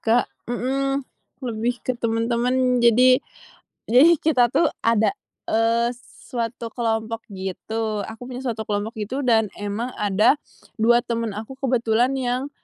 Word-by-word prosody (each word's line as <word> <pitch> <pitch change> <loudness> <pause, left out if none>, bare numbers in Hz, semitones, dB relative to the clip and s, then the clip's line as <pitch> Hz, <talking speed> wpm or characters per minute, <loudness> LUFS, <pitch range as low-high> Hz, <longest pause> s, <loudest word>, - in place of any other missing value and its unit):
Kak, 235 +2 +3 0.2
mhm. 270 +3 -1 0.4
Lebih 240 +1 -2
ke 255 - 0
temen-temen, 240 +2 +1
jadi 250 +2 +5 0.7
jadi 295 +8 +6
kita 255 -7 +3
tuh 335 - +3 0.2
ada, 230 - +2 0.3
eee, 230 +2 +2
suatu 235 -3 -5
kelompok, 225 -1 -2
gitu 210 +3 -3
aku 225 +4 -8
punya 255 0 -6
suatu 220 -4 -3
kelompok 210 +2 -3
gitu, 240 +7 -3
dan 225 -4 +3
emang 205 +5 -4
ada, 205 +4 +3 0.4
2 235 +2 +4
temen 230 -1 -2
aku 215 +5 -7
kebetulan 245 -2 +1
yang, 255 +2 -2
235 Hz, 130 wpm, -23 LUFS, 220-250 Hz, 0.7 s, jadi